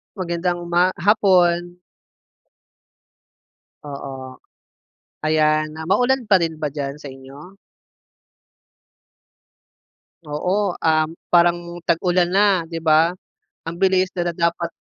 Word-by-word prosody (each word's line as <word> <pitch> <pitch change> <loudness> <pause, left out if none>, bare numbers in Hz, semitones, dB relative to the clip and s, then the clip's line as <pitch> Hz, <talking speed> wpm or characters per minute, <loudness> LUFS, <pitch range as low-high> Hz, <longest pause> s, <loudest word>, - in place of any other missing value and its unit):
Magandang 175 -1 -3
uma 175 +2 +2
hapon. 175 -3 +2 2.1
Oo. 135 -2 -9 0.9
Ayan, 155 0 +2
na 160 0 -7
maulan 245 +6 +1
pa 190 - +6
rin 160 -2 -3
ba 155 - -2
diyan 140 0 -5
sa 150 - -11
inyo? 135 +7 -13 2.7
Oo, 180 +6 -1
um, 155 -1 +2 0.2
parang 175 0 +2
tag-ulan 175 +1 +2
na, 195 -3 +3
di 165 0 -7
ba? 160 +2 +3 0.5
Ang 165 +1 -6
bilis 190 -1 +2
na 175 -1 -2
da 170 - -4
dapat. 170 0 -1
170 Hz, 100 wpm, -20 LUFS, 155-180 Hz, 2.7 s, pa